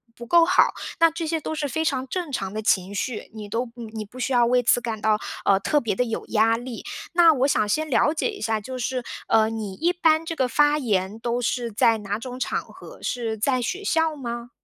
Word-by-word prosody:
不 235 - -9
够 335 +6 +5
好， 370 +2 +4 0.3
那 330 - +6
这 330 +1 -4
些 320 0 -1
都 315 - -4
是 300 -2 -2
非 320 +4 -1
常 270 -4 -1
正 345 -1 -4
常 195 -5 -3
的 215 - -3
情 195 -1 +1
绪， 235 +3 -3
你 210 -2 -8
都 235 +3 -2
你 235 -2 -8
你 215 -1 -6
不 230 +5 -15
需 255 +2 -2
要 240 -1 +4
为 245 +1 +3
此 245 - +4
感 225 -2 -4
到， 215 -1 +2 0.2
呃， 195 -1 +4
特 295 +8 +1
别 220 -5 -1
地 250 - +1
有 225 - -3
压 225 +1 +3
力。 240 0 -7 0.3
那 340 -2 +6
我 270 -1 +2
想 215 -7 +2
先 310 +9 0
了 295 +3 +3
解 325 - -1
一 410 - -7
下， 220 -1 -1
就 255 +4 -6
是， 250 0 -2 0.2
呃， 220 -1 +4
你 220 -3 -5
一 335 - +1
般 325 -2 +2
这 330 - -3
个 265 -5 0
发 295 +3 +3
言 210 -6 -1
都 240 +1 -1
是 240 0 -1
在 225 +2 +4
哪 205 -1 -3
种 250 +2 -7
场 - - -1
合， - - -13
是 225 -3 -2
在 255 +3 +1
学 370 - -3
校 320 -5 +1
吗？ 240 -3 -6
245 Hz, 260 characters per minute, -24 LUFS, 220-300 Hz, 0.3 s, 那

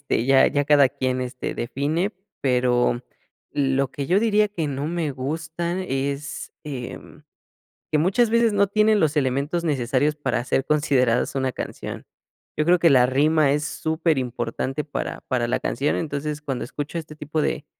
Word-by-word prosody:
este, 115 - -1
ya 135 0 +5
ya 145 0 +1
cada 145 -2 +5
quien 130 0 -2
este 125 0 -4
define, 155 - -1 0.3
pero 125 -2 +2 0.5
lo 135 -1 +1
que 140 -1 -4
yo 190 +4 +3
diría 215 -2 +3
que 165 -7 -3
no 140 +2 -3
me 165 -3 -1
gusta 160 +6 -3
es, 140 -1 -3
em, 130 -5 -8 0.7
que 150 - +3
muchas 195 +9 +3
veces 230 -1 +3
no 200 0 +3
tienen 215 +1 +3
los 155 -3 +1
elementos 140 +5 0
necesarios 145 0 +1
para 130 -5 -1
ser 135 - 0
considerados 135 -5 +2
una 130 -1 0
canción. - - -6 0.5
Yo 155 - +3
creo 175 +2 +4
que 165 - +5
la 125 -2 +6
rima 145 +2 +3
es 150 +1 0
superimportante 135 -5 -1
para 145 - -5
para 125 -3 +1
la 125 - -1
canción, 140 +5 0
entonces 150 -1 -3
cuando 135 -4 -3
escucho 145 +6 -5
este 155 -1 -8
tipo 150 +1 -3
de 145 - -1
145 Hz, 160 wpm, -23 LUFS, 130-160 Hz, 0.7 s, la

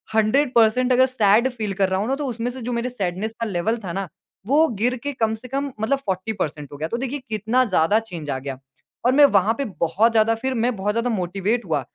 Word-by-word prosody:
100% 240 +1 +3
अगर 260 +1 +5
sad 235 -1 +3
feel 215 -5 -4
कर 190 - +3
रहा 190 0 0
हूँ 210 - -1
ना 265 - +1
तो 290 +1 -4
उसमें 240 0 -3
से 255 0 -9
जो 245 +1 -3
मेरे 235 +2 -1
सैडनेस 210 -1 -3
का - - +1
लेवल 205 +4 -1
था 175 - -4
ना, 195 +1 -3 0.4
वो 300 +5 +4
गिर 245 +2 +2
के 285 0 -2
कम 225 -3 0
से 225 +3 -11
कम 275 +2 -3
मतलब 240 +6 +1
40% 185 -7 -3
हो 145 - -9
गया। 155 +2 -3
तो 235 - -2
देखिए 270 +3 -3
कितना 220 +4 +1
ज़्यादा 200 0 +3
चेंज 170 -9 -8
आ 130 - -1
गया। 135 0 -6 0.5
और 250 - +4
मैं 290 0 +8
वहाँ 205 +4 +2
पे 280 - -1 0.2
बहुत 190 +8 +3
ज़्यादा 225 0 +3
फिर 265 0 0
मैं 250 -1 0
बहुत 205 +1 -1
ज़्यादा 230 +2 0
मोटिवेट 195 +6 -1
हुआ 160 -5 0
220 Hz, 235 wpm, -22 LUFS, 190-250 Hz, 0.5 s, मैं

